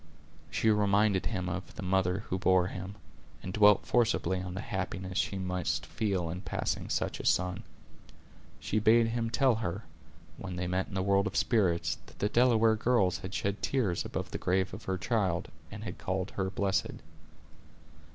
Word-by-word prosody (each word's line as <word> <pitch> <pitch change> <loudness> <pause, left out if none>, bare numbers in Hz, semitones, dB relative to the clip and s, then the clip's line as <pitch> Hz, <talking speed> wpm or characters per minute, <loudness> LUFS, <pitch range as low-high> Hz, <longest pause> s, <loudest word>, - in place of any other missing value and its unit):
She 110 - +2
reminded 105 -1 +2
him 95 -5 -2
of 90 0 -5
the - - -6
mother 95 +1 +1
who 95 - -1
bore 95 -1 +4
him, 95 +1 -6 0.5
and 95 - -5
dwelt 105 -1 +5
forcibly 110 -6 +1
on 90 0 -6
the 100 - -3
happiness 95 -1 -4
she 100 - -1
must 90 -2 -2
feel 95 -5 -1
in 90 +2 -5
possessing - - -3
such - - -1
a - - -6
son. 90 0 +1 1.0
She 110 - -1
bade 115 +2 +5
him 115 0 -1
tell 125 0 +3
her, 100 +1 -3 0.5
when 95 -2 -6
they 90 +1 -2
met 90 +1 -1
in 100 - -9
the 95 - 0
world 100 +1 +3
of - - -6
spirits, 95 -8 +1
that - - -16
the 105 - 0
Delaware 115 -2 +4
girls 105 -5 +2
had 95 +1 -6
shed 100 0 -2
tears 110 -8 0
above - - -5
the - - -4
grave 95 +1 0
of - - -8
her 95 -1 -1
child, 95 -3 0 0.2
and - - -8
had - - -6
called 95 +1 -2
her 95 -1 -2
blessed. 95 0 -1
95 Hz, 180 wpm, -30 LUFS, 90-110 Hz, 1.0 s, dwelt